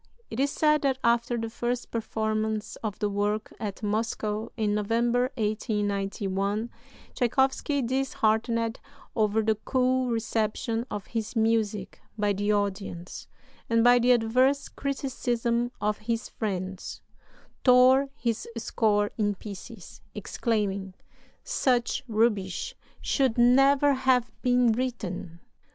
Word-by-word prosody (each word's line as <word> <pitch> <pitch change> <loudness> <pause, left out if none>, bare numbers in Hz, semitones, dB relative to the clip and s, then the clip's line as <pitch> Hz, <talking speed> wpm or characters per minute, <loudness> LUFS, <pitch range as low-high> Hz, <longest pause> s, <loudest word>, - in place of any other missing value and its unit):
It 225 - -4
is 280 +1 +2
said 300 0 +2
that 270 -2 +1
after 235 +1 +2
the 225 0 -2
first 240 +1 -3
performance 220 -1 -2
of 215 -3 -4
the 210 - 0
work 205 +1 -1
at 210 -1 -5
Moscow 215 0 -1
in 210 -2 +1
November, 235 +4 +1
1891, 205 -1 -1 0.4
Tschaikowsky, 265 +3 +1
disheartened 230 -2 0 0.4
over 220 0 +2
the 220 0 +3
cool 255 +3 0
reception 225 +1 -1
of 205 -2 -5
his 225 0 -4
music 220 -3 0 0.2
by 205 -1 +1
the 205 +2 0
audience, 195 -4 -3 0.4
and 230 0 +3
by 245 0 +6
the 245 +1 +4
adverse 250 +4 +3
criticism 245 -3 -1
of 210 0 -1
his 230 +2 -3
friends, 190 -3 -4 0.6
"tore 260 +2 +6
his 230 -2 -2
score 210 -2 +1
in 205 -1 +1
pieces, 200 0 -10
exclaiming, 200 -5 -2 0.5
'Such 245 -3 +1
rubbish 210 -5 0 0.3
should 265 -5 +1
never 270 +4 +5
have 255 -3 +2
been 245 -1 +3
written!'" 195 -8 -4
225 Hz, 115 wpm, -27 LUFS, 210-245 Hz, 0.6 s, by